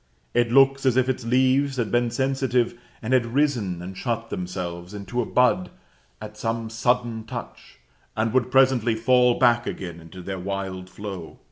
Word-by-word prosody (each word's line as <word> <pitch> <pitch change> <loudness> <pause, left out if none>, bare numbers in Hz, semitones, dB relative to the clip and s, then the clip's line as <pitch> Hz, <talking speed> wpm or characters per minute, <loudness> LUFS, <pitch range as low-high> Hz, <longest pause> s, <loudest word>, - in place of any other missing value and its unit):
It 120 -1 +2
looks 135 +1 +5
as 130 -1 +3
if 130 -1 +3
its 130 -2 -2
leaves 130 +3 +2
had 115 -4 -1
been 120 0 +2
sensitive, 130 -1 0 0.3
and 115 +4 -1
had 130 -2 +4
risen 115 - 0
and 95 +1 -7
shut 115 +2 -3
themselves 90 0 -5
into 100 +5 -3
a 115 - -4
bud 125 -7 +2 0.5
at 105 0 -9
some 115 +1 -3
sudden 120 0 0
touch, - - -9 0.4
and 110 +1 0
would 125 -1 +2
presently 130 -3 +3
fall 125 +1 +3
back 120 -1 +3
again 85 -3 -5
into 85 +2 -11
their 95 +1 -5
wild 95 -1 -4
flow. 95 -3 -8
115 Hz, 165 wpm, -24 LUFS, 95-125 Hz, 0.5 s, looks